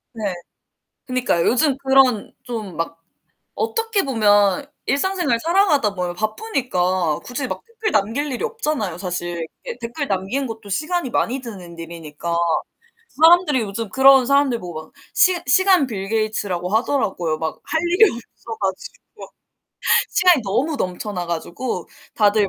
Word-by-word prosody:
네. 210 -3 -2 0.8
그니까요. 250 -9 0
요즘 265 +2 +3
그런 265 -5 +3
좀 220 -7 -6
막 165 0 -4 0.5
어떻게 450 -2 0
보면 215 0 +3 0.2
일상생활 340 -4 +1
살아가다 325 - +2
보면 180 -2 -3
바쁘니까 185 - -1
굳이 255 +2 -3
막 - - -5
댓글 445 -2 -4
남길 250 +9 0
일이 245 - -3
없잖아요, 305 - -2
사실. 175 -3 -3 0.2
이렇게 485 -1 -6
댓글 240 +5 -4
남기는 195 +8 -1
것도 225 -2 -8
시간이 310 - -1
많이 255 +3 0
드는 185 -8 -10
일이니까. 165 0 -5 0.7
사람들이 320 -2 +4
요즘 215 +1 -4
그런 265 +2 +6
사람들 280 -3 +2
보고 170 -3 -7
막 - - -25 0.2
시 350 +7 +6
시간 375 -1 +5
빌 195 -4 -5
게이츠라고 210 -5 -1
하더라고요. 205 - 0
막 160 0 -4
할 320 0 -1
일이 405 +3 +5
없어 230 -1 -9
가지고 190 -2 -6 0.8
시간이 360 -7 +4
너무 270 +10 -1
넘쳐나 185 -1 -3
가지고 175 +4 -4 0.3
다들 210 -1 +3
230 Hz, 310 characters per minute, -21 LUFS, 185-285 Hz, 0.8 s, 그런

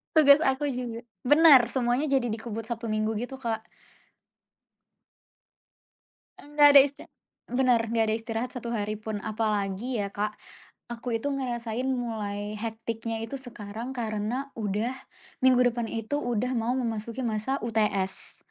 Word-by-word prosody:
Tugas 285 -2 +8
aku 270 +2 +1
juga 245 -3 -4 0.2
bener 290 -3 +8
semuanya 250 +2 +1
jadi 270 -4 +1
dikebut 225 0 -5
Sabtu, 235 0 -4
Minggu 215 0 -1
gitu 270 - -12
Kak. 225 -2 -2 2.8
Nggak 295 0 +5
ada 280 - +11
istir 280 0 -3 0.4
bener 245 -3 +1
nggak 225 -1 +2
ada 215 - +2
istirahat 225 +2 -3
1 235 -1 -4
hari 215 -2 -2
pun. 215 0 -5
Apalagi 215 +2 -1
ya 200 - -2
Kak, 210 +1 -2 0.6
aku 235 0 -3
itu 285 +5 -2
ngerasain 245 -2 -2
mulai 215 -5 -3
hectic-nya 225 0 -4
itu 265 +5 -5
sekarang 235 0 -7
karena 235 +4 -3
udah 210 +3 -1 0.5
minggu 255 -1 +5
depan 235 -1 -3
itu 225 +6 -2
udah 245 -2 -1
mau 235 +1 0
memasuki 230 0 -3
masa 225 +3 -1
UTS. 210 -4 -1
230 Hz, 135 wpm, -27 LUFS, 220-255 Hz, 2.8 s, ada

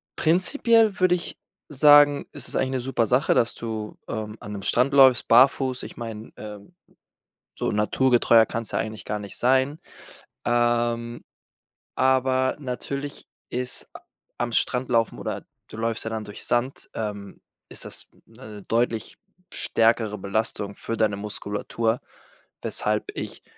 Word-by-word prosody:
prinzipiell 215 - +3
würde 185 -1 +4
ich 175 - -6 0.3
sagen, 145 0 +6
ist - - -5
es - - -6
eigentlich 130 0 0
'ne 130 - -1
super 120 -3 0
Sache, 125 +5 +3
dass 115 - +2
du, 110 -2 -5
ähm, 110 -1 -4
an 105 - -8
'nem 100 - -5
Strand 125 +3 +2
läufst, 130 -3 +6
barfuß. 130 +1 +4
Ich - - -8
meine, 115 -1 -7
ähm, 105 - -10 0.8
so - - -1
naturgetreuer 115 +1 +4
kann's 115 -3 -4
ja - - 0
eigentlich 110 -1 -5
gar 105 0 -2
nicht 100 -1 -9
sein. 130 +4 +2 0.7
Ähm, 120 0 0 0.7
aber 130 0 +2
natürlich 140 +2 -5 0.2
ist 125 0 -4
a - - -10 0.4
am 120 0 -2
Strand 125 +3 0
laufen 115 -2 +1
oder - - -4 0.2
du - - -11
läufst 115 0 -2
ja - - -2
dann 110 -1 -3
durch 105 0 -8
Sand, 125 +3 -1
ähm, 105 -2 -6 0.3
ist - - -8
das - - -7 0.2
'ne 105 -2 -12
deutlich 115 -1 -1 0.4
stärkere 110 -2 +1
Belastung 100 0 -2
für 115 - -4
deine 105 -2 +1
Muskulatur, 105 +2 -2 0.6
weshalb 105 0 -1
ich - - -6
120 Hz, 145 wpm, -25 LUFS, 110-130 Hz, 0.8 s, sagen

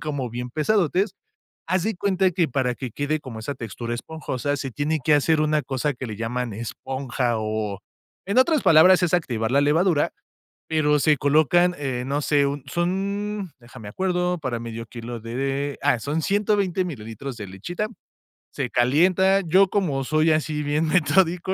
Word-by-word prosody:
como 145 -5 -3
bien 125 +1 -5
pesadotes. 185 - +1 0.5
Haz 185 -1 +1
de 220 +1 -1
cuenta 190 0 +1
que 170 -1 +1
para 130 -2 0
que 130 - -5
quede 145 +5 -1
como 125 -6 -8
esa 115 +6 -4
textura 115 -1 -6
esponjosa, 145 +1 -3
se 135 -1 -5
tiene 150 +5 -1
que 155 - +4
hacer 155 +2 +3
una 155 0 +2
cosa 140 +2 -2
que 130 0 -7
le 110 - -6
llaman 120 +1 -3
esponja 125 +2 -3
o 110 -2 -3 0.5
en 200 +5 -1
otras 305 +3 +3
palabras, 180 +4 +6
es 175 - 0
activar 115 -9 -2
la 140 +2 +4
levadura, 155 +2 +2 0.6
pero 150 -2 +2
se 150 +1 +3
colocan, 155 +6 +3
eh, 130 -4 -2
no 140 +2 -1
sé, 145 -1 +2
un 140 -1 -4
son, 195 +4 -2
deja 120 +2 -14
me 110 - -10
acuerdo, 180 - -1
para 130 -6 -3
medio 115 0 -7
kilo 120 0 -7
de 135 +5 -3
ah, 145 -4 +3
son 145 +6 -2
120 200 0 +1
mililitros 125 - -7
de 105 -3 -7
lechita. 120 - -4 0.7
Se 135 -3 -3
calienta, 180 +11 +3
yo, 190 +2 +4
como 155 -10 0
soy 155 +3 +2
así 155 -1 0
bien 150 +2 0
metódico, 180 +2 +2
145 Hz, 170 wpm, -23 LUFS, 125-175 Hz, 0.7 s, palabras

